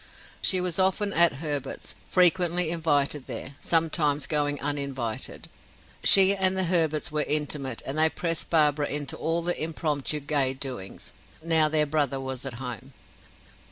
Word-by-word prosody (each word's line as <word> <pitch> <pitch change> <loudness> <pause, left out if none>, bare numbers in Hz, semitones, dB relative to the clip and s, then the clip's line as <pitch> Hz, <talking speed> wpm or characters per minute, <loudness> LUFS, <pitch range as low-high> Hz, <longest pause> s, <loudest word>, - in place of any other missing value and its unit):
She 185 - +3
was 180 -1 +1
often 195 +2 +1
at 170 0 +5
the 135 - -11
Herberts'; 145 -2 -5 0.2
frequently 180 -2 +3
invited 150 -4 -1
there 135 +2 -6
sometimes 155 -3 +1
going 145 -2 -1
uninvited. 140 -5 -4 0.6
She 195 0 +7
and 190 -1 +1
the 190 - +1
Herberts 160 -4 0
were 150 0 -1
intimate 145 -4 -1
and 140 +3 -2
they 160 0 +7
pressed 165 -1 -3
Barbara 150 -2 +2
into 145 0 -4
all 165 +1 -2
the 175 -2 -2
impromptu 150 -2 -2
gay 140 -2 0
doings, 120 - -8 0.3
now 160 -2 +2
their 155 -1 +1
brother 145 -3 -1
was 130 0 -6
at 125 - -4
home. 125 +1 -8
150 Hz, 150 wpm, -25 LUFS, 140-165 Hz, 0.6 s, She